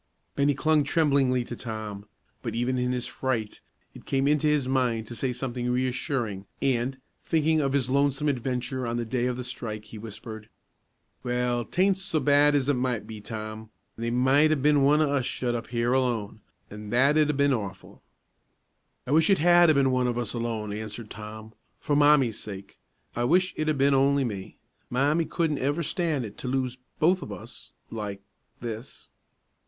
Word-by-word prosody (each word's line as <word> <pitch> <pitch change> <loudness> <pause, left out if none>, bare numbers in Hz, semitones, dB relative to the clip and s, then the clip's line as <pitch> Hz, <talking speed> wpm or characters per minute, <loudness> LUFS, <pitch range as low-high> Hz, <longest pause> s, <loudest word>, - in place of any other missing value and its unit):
Bennie 140 0 +2
clung 155 +2 +3
tremblingly 140 -4 +2
to 120 - -7
Tom; 110 -4 -6 0.3
but, 115 -3 -4
even 125 +2 0
in 125 0 0
his 125 -1 -1
fright, 115 -5 -3 0.3
it - - -14
came 135 0 +1
into 150 +1 +2
his 150 -3 +2
mind 125 -4 +1
to 120 - -9
say 125 +3 -2
something 125 -1 -3
reassuring, 125 -5 -1
and, 130 0 0 0.2
thinking 160 -1 +2
of 135 -1 0
his 135 -3 +1
lonesome 140 +2 +1
adventure 130 -1 -2
on 115 0 -2
the 120 - -2
day 120 +2 0
of 125 -1 -2
the 125 - -4
strike, 110 -4 -6
he 105 +1 -10
whispered, 110 0 -9 0.7
"Well, 125 -1 0
'taint 190 - +1
so 190 -5 -1
bad 145 0 +4
as 140 -2 +1
it 145 - +3
might 125 -3 -1
be, 110 -2 -8
Tom; 110 0 -7 0.3
they 115 +1 -3
might 130 +5 +4
'a' - - +4
been 145 +1 +3
one 145 +3 +4
of 150 - +2
us 140 -2 +1
shut 120 0 -2
up 120 - -4
here 120 +1 0
alone, 115 -5 -1 0.3
an' 105 0 -8
that'd 145 +6 +4
'a' - - +2
been 140 0 +3
awful." 100 -5 -6 1.0
"I 125 - -4
wish 160 +3 +4
it 195 - +5
had 175 +1 +6
'a' 155 - +5
been 135 -1 +3
one 125 -1 +2
of 120 -1 -1
us 120 -3 -3
alone," 115 -3 -3
answered 110 +1 -7
Tom, 110 +1 -9 0.3
"for 145 - 0
Mommie's 145 -6 +4
sake. 100 -2 -9 0.4
I 120 - 0
wish 185 +7 +3
it'd 155 0 -1
'a' 155 - +2
been 140 +1 +4
only 140 +1 +3
me. 100 -6 -5 0.3
Mommie 145 +6 +2
couldn't 160 -4 -1
ever 145 +5 0
stan' 155 -6 -1
it 105 - -10
to - - -5
lose 130 -1 -1 0.2
both 180 +4 +3
of - - -7
us - - -9 0.2
like 105 -3 -5 0.4
this." 115 +1 -7
125 Hz, 185 wpm, -27 LUFS, 115-145 Hz, 1.0 s, had